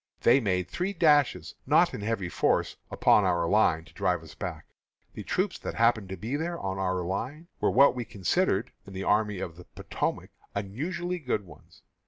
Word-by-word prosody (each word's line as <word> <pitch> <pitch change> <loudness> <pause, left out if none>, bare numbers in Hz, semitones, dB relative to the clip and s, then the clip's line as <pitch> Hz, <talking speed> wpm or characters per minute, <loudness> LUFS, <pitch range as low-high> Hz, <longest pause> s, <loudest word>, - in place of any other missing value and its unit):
They 125 +4 +5
made 90 -6 0
three 180 - -2
dashes, 145 - +3
not - - +4
in - - -5
heavy 105 -3 -2
force, - - +1
upon 105 - +4
our 85 -2 +1
line 85 -5 +3
to - - -18
drive 90 -4 0
us 75 -3 -12
back. - - -6 0.5
The - - -7
troops 185 0 -1
that - - -5
happened 115 -4 +2
to 95 - -5
be 115 +10 -3
there 170 +3 -2
on 95 0 -3
our 95 -1 0
line 130 - -4
were - - +2
what 140 +2 +6
we 125 -1 -3
considered, 105 - 0 0.2
in 100 - -10
the 95 +1 -4
Army 105 -1 +1
of 85 -2 -6
the 90 - -12
Potomac, - - -4 0.2
unusually 170 - -3
good 125 - -2
ones. 80 -5 -17
105 Hz, 190 wpm, -28 LUFS, 95-140 Hz, 0.5 s, what